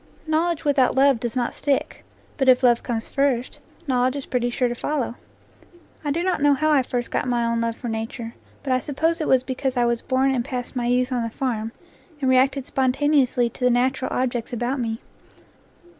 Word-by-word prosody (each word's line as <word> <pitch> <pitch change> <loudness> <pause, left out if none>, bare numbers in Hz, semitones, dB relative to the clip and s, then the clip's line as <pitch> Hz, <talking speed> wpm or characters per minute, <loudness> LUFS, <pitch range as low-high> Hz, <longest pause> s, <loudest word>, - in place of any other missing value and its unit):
Knowledge 320 +1 0
without 275 -3 +3
love 270 -2 +4
does 240 +1 -4
not 245 -2 -1
stick; 280 -2 -1 0.3
but 265 -2 +3
if 255 0 +5
love 240 -2 +4
comes 230 -2 -3
first, 270 -3 0 0.3
knowledge 255 -1 +1
is 280 - -4
pretty 245 -1 -1
sure 245 +1 0
to 240 - -2
follow. 265 0 -2 0.9
I 295 - -2
do 330 +5 0
not 370 -5 0
know 290 0 +5
how 310 +2 +1
I 290 -3 +5
first 245 -1 -3
got - - -1
my 240 -1 +1
own 230 0 0
love 230 0 -1
for 245 - -6
nature, 225 +1 -4 0.3
but 265 -2 0
I 255 - +2
suppose 320 +5 -1
it 310 - -1
was 260 -1 +4
because 260 0 -3
I 240 - +3
was 235 -1 0
born 265 +1 +1
and 245 -2 0
passed 250 +1 -5
my 240 -1 -1
youth 250 +1 +1
on 250 -2 0
the 230 - -2
farm, 225 -2 -3 0.5
and 270 - -1
reacted 265 +1 +3
spontaneously 265 -2 +2
to 250 - -8
the 250 - +5
natural 255 +2 +1
objects 245 -1 -2
about 245 +3 -2
me. 225 -2 -3
255 Hz, 205 wpm, -23 LUFS, 240-275 Hz, 0.9 s, if